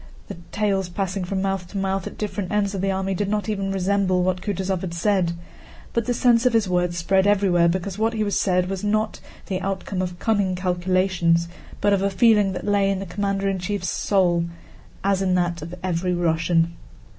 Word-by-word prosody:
The - - -6
tales 195 -3 0
passing 190 +1 -2
from 190 +1 -2
mouth 195 -2 -2
to 200 - -7
mouth 195 -1 -1
at - - -9
different 205 -3 -3
ends 205 -1 +1
of 195 - -3
the 195 - 0
army 190 0 -1
did 195 +2 -1
not 210 0 -1
even 195 -2 -2
resemble 190 -1 +1
what 185 0 0
Kutúzov 190 -2 -2
had 175 -3 -5
said, 185 -1 +1 0.6
but 235 0 0
the 245 - +2
sense 235 -1 +4
of 250 - +1
his 225 -3 +3
words 180 -1 0
spread 190 +3 +2
everywhere 190 -4 +3
because 185 +3 -2
what 225 +1 +1
he 215 -2 -1
said 180 -2 +1
was 195 0 -4
not 215 +1 0 0.3
the 185 -1 -3
outcome 190 0 -3
of 180 -1 -4
cunning 200 -3 +1
calculations, 180 -2 +1 0.3
but 205 0 +3
of 195 - +2
a 200 - +2
feeling 205 -1 +4
that - - -5
lay 200 -1 +2
in 195 - 0
the 195 - -5
commander 195 +2 -1
in 195 -1 0
chief's 185 0 -2
soul 175 -4 +2 0.6
as 195 -1 +2
in 185 -1 +2
that 175 -2 0
of 165 +3 -7
every 180 0 0
Russian. 165 0 +1
190 Hz, 200 wpm, -23 LUFS, 180-200 Hz, 0.6 s, sense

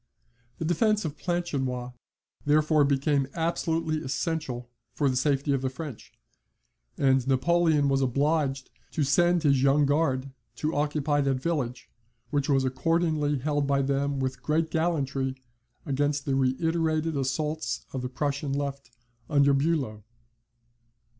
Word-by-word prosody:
The 165 - -3
defence 210 +5 +2
of 150 -2 -3
Planchenoit 135 -9 -2 0.5
therefore 150 +1 +3
became 140 0 +1
absolutely 165 -1 -1
essential 135 -2 -3 0.3
for 145 - +1
the 130 - +1
safety 140 +2 +1
of 135 - 0
the 130 - -1
French, 135 -2 -8 0.9
and 135 -2 +2
Napoleon 155 +2 +3
was 135 0 +2
obliged 135 +1 0 0.2
to 155 - +1
send 175 +4 +3
his 140 -3 +3
Young 140 +2 +4
Guard 140 -2 +1 0.2
to 155 +1 -2
occupy 145 0 +1
that 135 -1 +1
village, 130 -4 -3 0.4
which 145 -1 0
was 135 -2 +3
accordingly 150 +2 +1
held 145 +1 -1
by 140 -1 +2
them 140 +1 0
with 130 -1 -2
great 160 +3 0
gallantry 140 -5 0 0.5
against 145 +1 0
the 140 - 0
reiterated 160 +4 +1
assaults 150 +4 -2
of 130 - -3
the 125 - -4
Prussian 140 +2 -2
left, 140 -2 -3 0.4
under 140 -2 +4
Bulow. 135 -8 0
145 Hz, 130 wpm, -27 LUFS, 135-155 Hz, 0.9 s, Young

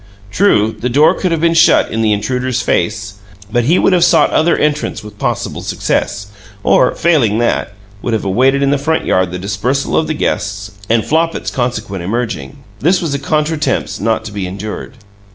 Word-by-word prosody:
True, 110 - +2
the 125 - -1
door 145 +5 +4
could 185 - -2
have 165 -2 0
been 165 0 +3
shut 165 +1 +4
in 115 - -1
the 110 -1 +2
intruder's 125 +4 -1
face, 105 -3 -1 0.3
but 120 0 +1
he 165 +7 +3
would 195 - +3
have 175 -2 +4
sought 170 -2 +4
other 170 +2 +2
entrance 150 -5 -1
with 105 -1 -12
possible - - -2
success, 100 0 -2 0.4
or, 125 - +3
failing 135 -11 +2
that, 120 -3 0 0.3
would 120 - -2
have 110 - -1
awaited 130 +8 +2
in 140 - +2
the 145 - +1
front 160 +3 0
yard 95 -1 +1
the 90 - -4
dispersal 105 +9 -2
of 160 - +1
the 155 - -2
guests 105 -6 -2 0.2
and 115 -1 +2
Flopit's 165 +2 0
consequent 110 -7 -3
emerging. 95 - -3 0.2
This 175 - +2
was 160 -5 -2
a 140 - -1
contretemps 150 +1 -1
not 110 +2 -1
to 110 - -6
be 100 -3 -4
endured. 100 +3 -7
120 Hz, 190 wpm, -15 LUFS, 105-150 Hz, 0.4 s, door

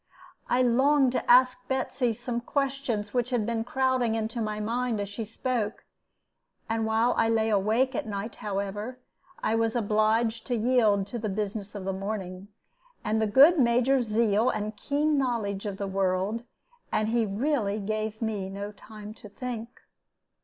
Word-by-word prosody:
I 255 +1 +3
longed 265 +2 +4
to 255 - -3
ask 250 0 +5
Betsy 260 -2 0
some 235 +2 -4
questions 265 -6 -2
which 245 -1 0
had 240 -4 0
been 230 0 -1
crowding 255 -2 +1
into 225 +1 -2
my 215 -1 -2
mind 230 +1 -1
as 200 - -2
she 215 +3 -5
spoke, 225 0 -3 0.8
and 225 0 -1
while 225 +2 +2
I 225 - +3
lay 225 -1 +2
awake 220 +6 +2
at 235 - -3
night; 205 +2 -5
however, 205 +4 -4 0.5
I 220 - +1
was 225 0 +1
obliged 220 +1 +1
to 245 - 0
yield 220 -4 +3
to 235 +4 -5
the 215 -1 -2
business 205 0 -4
of 195 -2 -6
the 195 - -1
morning, 190 -1 -5 0.6
and 220 -1 0
the 220 - +2
good 290 +10 +7
Major's 250 +1 +3
zeal 215 +1 +2
and 215 0 -3
keen 290 +6 +1
knowledge 215 -6 -1
of 200 -1 -4
the 200 - -3
world; 195 +4 -1 0.5
and 215 0 +1
he 230 0 +2
really 215 0 0
gave 215 +2 -3
me 205 -4 -2
no 200 +1 -5
time 210 0 -11
to 210 - -13
think. 230 +1 -5
220 Hz, 165 wpm, -27 LUFS, 210-245 Hz, 0.8 s, good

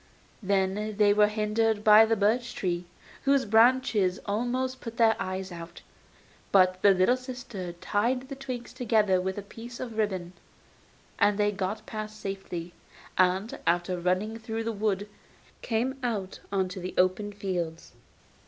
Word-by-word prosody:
Then 200 +1 0
they 205 -1 +5
were 210 0 +5
hindered 215 0 0
by 215 +1 +8
the 225 0 +2
birch 225 +4 +1
trees, 175 -2 -2 0.4
whose 275 -2 +3
branches 220 -4 +3
almost 255 +5 -1
put 230 -1 -7
their 225 -1 +5
eyes 185 0 -4
out. 170 0 -9 0.7
But 185 -1 +4
the 205 - +6
little 190 +5 +4
sister 245 -8 -7
tied 235 +9 -1
the 275 - -6
twigs 255 -3 -6
together 215 -7 +2
with 190 +1 -3
a 205 - -4
piece 235 +4 -10
of 230 -3 -5
ribbon, 185 -4 -1 0.9
and 205 0 +4
they 210 0 +2
got 195 +1 -3
past 215 0 -6
safely, 185 -4 -5 0.4
and, 185 +4 +1
after 175 +2 +1
running 185 +6 -1
through 225 0 -4
the 230 - -1
wood, 205 -1 -1 0.5
came 250 +4 -1
out 210 -6 -3
on 190 -2 +1
to 185 - -7
the 185 +1 -6
open 185 +3 +2
fields. 180 -5 -4
210 Hz, 150 wpm, -28 LUFS, 185-230 Hz, 0.9 s, by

